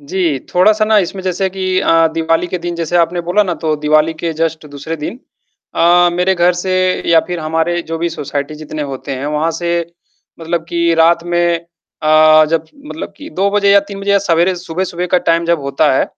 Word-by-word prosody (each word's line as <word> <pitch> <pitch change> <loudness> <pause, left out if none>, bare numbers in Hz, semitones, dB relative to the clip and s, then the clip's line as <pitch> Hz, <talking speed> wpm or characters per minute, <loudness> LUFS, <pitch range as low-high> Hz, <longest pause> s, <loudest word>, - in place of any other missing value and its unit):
जी, 155 -1 -1 0.2
थोड़ा 185 +4 +5
सा 215 0 0
ना 215 0 +2
इसमें 190 0 -2
जैसे 190 +1 -1
कि 185 -1 -1
अ, 165 0 +3
दिवाली 165 +1 0
के 180 +1 -4
दिन 175 0 -4
जैसे 170 +1 -1
आपने 175 +1 +1
बोला 210 +4 +3
ना 180 -3 -2
तो 155 -2 0
दिवाली 155 +2 +2
के 165 +1 -3
जस्ट 160 -1 -2
दूसरे 145 +3 -6
दिन 155 +11 -6 0.6
अ, 175 +1 +4
मेरे 180 +2 +1
घर 175 0 +3
से 185 +1 -3 0.4
या 165 -1 +6
फिर 175 -2 -4
हमारे 160 +2 -1
जो 165 0 -5
भी 170 +1 -1
सोसाइटी 145 -1 -4
जितने 155 0 -6
होते 135 +1 -6
हैं, 135 +2 -4
वहाँ 150 +2 0
से 170 +1 -1 0.6
मतलब 165 0 -2
कि 170 -1 +1
रात 170 +1 +3
में 175 0 +1 0.5
अ, 155 0 +6
जब 165 -1 0 0.2
मतलब 315 - -7
कि 305 +1 -10
2 200 +1 +2
बजे 200 -1 +2
या 200 - +6
3 200 -1 -7
बजे 200 0 -2
या 200 - +5
सवेरे 180 -1 +1
सुबह-सुबह 175 +1 -4
का - - +5
टाइम 170 0 +2
जब 170 -3 +1
होता 140 +2 +1
है, - - +2
170 Hz, 210 wpm, -15 LUFS, 160-180 Hz, 0.6 s, या